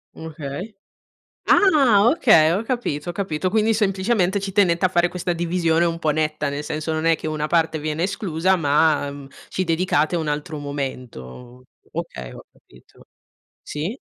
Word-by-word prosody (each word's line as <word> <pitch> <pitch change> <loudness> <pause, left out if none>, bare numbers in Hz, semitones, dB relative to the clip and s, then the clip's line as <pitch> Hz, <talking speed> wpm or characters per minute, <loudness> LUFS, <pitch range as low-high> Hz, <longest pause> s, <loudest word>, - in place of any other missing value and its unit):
Okay. 160 +5 -7 0.7
Ah! 260 - +5
Okay, 170 - +5
ho 195 +5 0
capito, 230 - -3
ho - - -5
capito. 185 -1 -2
Quindi, 220 +1 +2
semplicemente 195 -1 +1
ci 195 0 -5
tenete 180 -3 +2
a - - -2
fare 175 -1 +2
questa 175 0 -3
divisione 170 -1 +1
un 165 -1 -1
po' 155 -2 0
netta, 150 -1 -1
nel 140 +1 -4
senso 155 +1 -4
non 155 0 -2
è 165 0 +3
che - - -7
una 155 -1 -2
parte 160 -2 +1
viene 155 +2 -2
esclusa 185 -2 0
ma, 150 -2 +2
mhmm, 140 -1 -10 0.2
ci 185 - -2
dedicate 165 -2 +1
un 160 -2 -2
altro 150 +1 -3
momento. 125 - -7 0.3
Okay, 65 -1 -6
ho - - -12
capito. 60 - -22 0.6
Sì? 160 +10 -5
165 Hz, 160 wpm, -22 LUFS, 150-185 Hz, 0.7 s, Ah